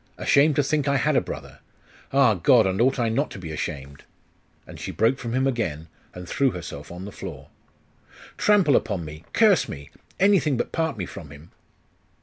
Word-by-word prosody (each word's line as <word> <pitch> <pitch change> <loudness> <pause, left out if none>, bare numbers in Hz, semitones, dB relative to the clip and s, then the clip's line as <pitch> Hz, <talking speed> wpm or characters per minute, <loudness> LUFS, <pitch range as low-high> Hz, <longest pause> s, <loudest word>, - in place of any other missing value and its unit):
ashamed 145 +1 +3
to 145 - +2
think 145 +1 0
that 140 - +2
I - - +3
had 150 +2 +1
a - - +4
brother.... - - -8 0.5
Ah, 135 -4 +4
God! 110 +4 +4
and 95 +3 0
ought 130 +3 +3
I 120 -2 +1
not 125 +7 0
to - - -9
be 85 -4 -7
ashamed?' 70 -2 -6 0.6
And - - -12
she - - -6
broke 125 +4 +1
from 115 -1 -5
him 130 +1 +1
again, 85 - -2 0.3
and 90 -1 -8
threw 135 +7 +1
herself 75 - -8
on 90 +2 -8
the 100 - -8
floor. - - -9 0.9
'Trample 195 -10 +3
upon 95 -6 -1
me; 75 +1 -10
curse 210 -7 +4
me! 70 -1 -9 0.3
anything 190 -8 +3
but - - -3
part 160 -6 -1
me 90 - -3
from 80 -2 -10
him! 70 +3 -14
115 Hz, 195 wpm, -24 LUFS, 85-140 Hz, 0.9 s, a